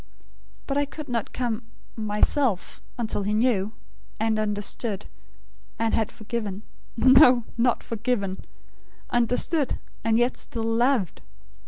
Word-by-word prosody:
But 275 Hz, +1 st, 0 dB
I 285 Hz, -, +2 dB
could 295 Hz, +1 st, -8 dB
not 230 Hz, -3 st, -2 dB
come 240 Hz, -2 st, -2 dB, 0.3 s
myself 215 Hz, +1 st, 0 dB, 0.2 s
until 225 Hz, -3 st, -1 dB
he 205 Hz, +1 st, 0 dB
knew; 215 Hz, -3 st, +2 dB, 0.5 s
and 220 Hz, 0 st, +1 dB
understood; 210 Hz, 0 st, -2 dB, 0.7 s
and 225 Hz, 0 st, 0 dB
had 220 Hz, 0 st, +1 dB
forgiven 215 Hz, -2 st, -4 dB, 0.3 s
no, 255 Hz, 0 st, +7 dB
not 240 Hz, 0 st, +2 dB
'forgiven'; 215 Hz, -4 st, -2 dB, 0.7 s
understood, 250 Hz, +5 st, +1 dB, 0.3 s
and 225 Hz, 0 st, +3 dB
yet 240 Hz, +2 st, +2 dB
still 230 Hz, -2 st, -4 dB
LOVED. 225 Hz, -, +1 dB
230 Hz, 115 wpm, -25 LUFS, 210-250 Hz, 0.7 s, no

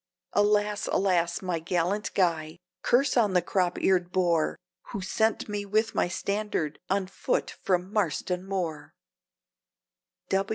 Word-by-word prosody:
Alas! 210 Hz, 0 st, +2 dB
alas! 175 Hz, -2 st, +1 dB
my 180 Hz, -3 st, -1 dB
gallant 180 Hz, +5 st, -1 dB
Guy! 165 Hz, -3 st, +1 dB, 0.2 s
curse 260 Hz, +2 st, +3 dB
on 215 Hz, -6 st, +3 dB
the 180 Hz, -, +4 dB
crop 180 Hz, 0 st, 0 dB
eared 180 Hz, -2 st, +2 dB
boor, 170 Hz, -4 st, +2 dB, 0.3 s
Who 200 Hz, -, -5 dB
sent 220 Hz, +4 st, 0 dB
me 205 Hz, -1 st, -3 dB
with 215 Hz, +2 st, +1 dB
my -, -, +2 dB
standard, 200 Hz, -4 st, -2 dB
on 195 Hz, 0 st, +1 dB
foot 185 Hz, -, -1 dB
from 185 Hz, +1 st, -1 dB
Marston 180 Hz, -2 st, 0 dB
Moor!" 175 Hz, -6 st, -4 dB
185 Hz, 125 wpm, -28 LUFS, 175-205 Hz, 0.3 s, the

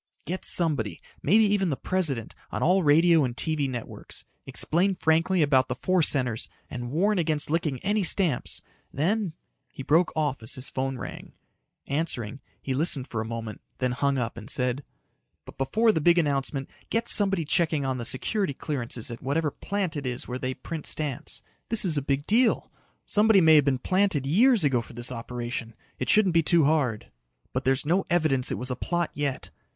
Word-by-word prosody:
"Get 185 Hz, +2 st, -4 dB
somebody 145 Hz, -, +1 dB, 0.2 s
maybe 215 Hz, +8 st, +4 dB
even 200 Hz, -3 st, +1 dB
the 140 Hz, -, 0 dB
President 150 Hz, -12 st, -2 dB, 0.2 s
on -, -, -3 dB
all 185 Hz, +3 st, +4 dB
radio 165 Hz, +1 st, +5 dB
and 125 Hz, -2 st, -3 dB
TV 155 Hz, -4 st, 0 dB
networks. 120 Hz, -3 st, -7 dB, 0.2 s
Explain 185 Hz, +4 st, +1 dB
frankly 165 Hz, +2 st, +2 dB
about 130 Hz, -3 st, +3 dB
the -, -, -3 dB
four 185 Hz, -1 st, +1 dB
centers 125 Hz, -7 st, +1 dB, 0.2 s
and 120 Hz, -1 st, -5 dB
warn 190 Hz, +8 st, +1 dB
against 155 Hz, -3 st, 0 dB
licking 155 Hz, -4 st, 0 dB
any 205 Hz, +1 st, 0 dB
stamps. 170 Hz, -7 st, +1 dB, 0.3 s
Then 185 Hz, +4 st, -1 dB, 0.2 s
" -, -, -47 dB
He 135 Hz, -, -8 dB
broke 165 Hz, +5 st, +3 dB
off 145 Hz, -5 st, -1 dB
as 110 Hz, -, -1 dB
his 130 Hz, +1 st, -2 dB
phone 135 Hz, 0 st, -2 dB
rang. -, -, -8 dB, 0.5 s
Answering, 140 Hz, -5 st, -3 dB, 0.2 s
he 135 Hz, -, -3 dB
listened 140 Hz, -2 st, 0 dB
for 110 Hz, -, -3 dB
a -, -, -4 dB
moment, 115 Hz, -1 st, -6 dB, 0.2 s
then 125 Hz, -1 st, 0 dB
hung 140 Hz, +2 st, 0 dB
up 115 Hz, -2 st, -3 dB
and 115 Hz, +2 st, -9 dB
said, 125 Hz, 0 st, -1 dB, 0.6 s
"But -, -, -14 dB
before 220 Hz, -, +2 dB
the 160 Hz, -, -1 dB
big 175 Hz, +3 st, +4 dB
announcement, 140 Hz, -3 st, 0 dB, 0.2 s
get 230 Hz, +1 st, -1 dB
somebody 195 Hz, -6 st, +5 dB
checking 155 Hz, -3 st, +1 dB
on 130 Hz, -1 st, -2 dB
the -, -, -4 dB
security 140 Hz, -, -1 dB
clearances 125 Hz, -6 st, -3 dB
at 115 Hz, -, -8 dB
whatever 145 Hz, +3 st, -1 dB
plant 195 Hz, -1 st, -3 dB
it 140 Hz, -3 st, -4 dB
is 125 Hz, -1 st, -4 dB
where 125 Hz, +1 st, -4 dB
they 130 Hz, 0 st, -3 dB
print 160 Hz, -3 st, -7 dB
stamps. 145 Hz, -5 st, -3 dB, 0.3 s
This's 200 Hz, -8 st, +3 dB
a 145 Hz, -, +1 dB
big 140 Hz, +1 st, -1 dB
deal. 230 Hz, +5 st, +2 dB, 0.3 s
Somebody 215 Hz, -1 st, +4 dB
may've 160 Hz, -4 st, +6 dB
been 135 Hz, -2 st, +2 dB
planted 185 Hz, -3 st, +1 dB
years 220 Hz, -, +4 dB
ago 135 Hz, -5 st, +2 dB
for 120 Hz, -, -13 dB
this 120 Hz, +2 st, -1 dB
operation. 120 Hz, -1 st, -5 dB, 0.2 s
It 130 Hz, -, -3 dB
shouldn't 205 Hz, -5 st, +4 dB
be 165 Hz, -, +4 dB
too 165 Hz, -1 st, +4 dB
hard. 140 Hz, -8 st, 0 dB, 0.4 s
"But 130 Hz, -, -2 dB
there's 135 Hz, +2 st, +1 dB
no 180 Hz, +5 st, +1 dB
evidence 155 Hz, -7 st, +2 dB
it -, -, -2 dB
was 125 Hz, +1 st, 0 dB
a -, -, -1 dB
plot 175 Hz, +6 st, -2 dB
yet. 145 Hz, -2 st, -3 dB
145 Hz, 185 wpm, -26 LUFS, 130-175 Hz, 0.6 s, may've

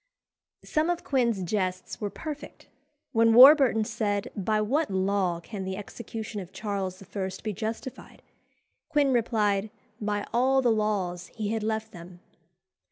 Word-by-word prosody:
Some 310 Hz, +2 st, 0 dB
of 350 Hz, -1 st, -1 dB
Quin's 235 Hz, -8 st, +1 dB
jests 185 Hz, +3 st, -3 dB
were 205 Hz, -, -1 dB
perfect. 295 Hz, -, -8 dB, 0.5 s
When 230 Hz, -2 st, +4 dB
Warburton 260 Hz, -3 st, +8 dB
said, 210 Hz, -2 st, -2 dB
"By 215 Hz, +2 st, 0 dB
what 275 Hz, +10 st, +1 dB
law 190 Hz, -2 st, 0 dB
can 195 Hz, +3 st, -7 dB
the 190 Hz, 0 st, -4 dB
execution 215 Hz, 0 st, -6 dB
of 180 Hz, -1 st, -11 dB
Charles 190 Hz, -1 st, -4 dB
I. 195 Hz, 0 st, -4 dB
be 215 Hz, -, -2 dB
justified?" 220 Hz, +5 st, -6 dB, 0.7 s
Quin 290 Hz, -4 st, +2 dB
replied, 215 Hz, -3 st, +1 dB, 0.3 s
"By 205 Hz, -1 st, -2 dB
all 260 Hz, +2 st, +3 dB
the 240 Hz, -, +4 dB
laws 200 Hz, -5 st, -1 dB
he 215 Hz, -3 st, -3 dB
had 225 Hz, 0 st, -1 dB
left 220 Hz, 0 st, -2 dB
them." 175 Hz, +1 st, -12 dB
215 Hz, 140 wpm, -27 LUFS, 195-235 Hz, 0.7 s, Warburton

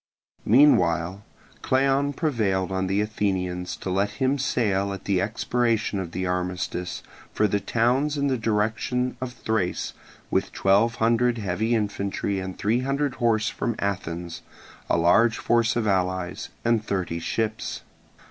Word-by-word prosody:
Meanwhile 95 Hz, -, +4 dB, 0.4 s
Cleon 135 Hz, +2 st, +2 dB
prevailed 105 Hz, -, 0 dB
on 95 Hz, 0 st, -1 dB
the 95 Hz, +2 st, +1 dB
Athenians 95 Hz, -4 st, -2 dB
to 95 Hz, -, -4 dB
let 100 Hz, +2 st, +1 dB
him 135 Hz, +3 st, +1 dB
set 135 Hz, -, 0 dB
sail 100 Hz, -4 st, +1 dB
at 95 Hz, -, -8 dB
the 95 Hz, -2 st, +1 dB
expiration 115 Hz, 0 st, 0 dB
of 90 Hz, -3 st, -5 dB
the 95 Hz, +2 st, -3 dB
armistice 90 Hz, 0 st, -3 dB, 0.3 s
for 105 Hz, -, +2 dB
the 100 Hz, +1 st, 0 dB
towns 125 Hz, +8 st, +1 dB
in 140 Hz, -, 0 dB
the 135 Hz, -2 st, +2 dB
direction 115 Hz, +3 st, 0 dB
of 125 Hz, -1 st, -4 dB
Thrace 110 Hz, -6 st, -2 dB, 0.4 s
with -, -, 0 dB
twelve 105 Hz, +5 st, +3 dB
hundred 120 Hz, +1 st, +2 dB
heavy 110 Hz, +3 st, 0 dB
infantry 100 Hz, -2 st, -1 dB
and 95 Hz, 0 st, -6 dB
three 110 Hz, +4 st, +1 dB
hundred 140 Hz, +1 st, -1 dB
horse 115 Hz, -1 st, +2 dB
from 120 Hz, -, -2 dB
Athens, 85 Hz, -4 st, -3 dB, 0.5 s
a -, -, +3 dB
large 110 Hz, +7 st, +4 dB
force 115 Hz, -1 st, +2 dB
of 120 Hz, -, +1 dB
the 105 Hz, -, +2 dB
allies, 95 Hz, -1 st, -1 dB, 0.2 s
and 115 Hz, -2 st, +2 dB
thirty 90 Hz, -5 st, -2 dB
ships. 110 Hz, +5 st, -3 dB
105 Hz, 150 wpm, -25 LUFS, 95-120 Hz, 0.5 s, Meanwhile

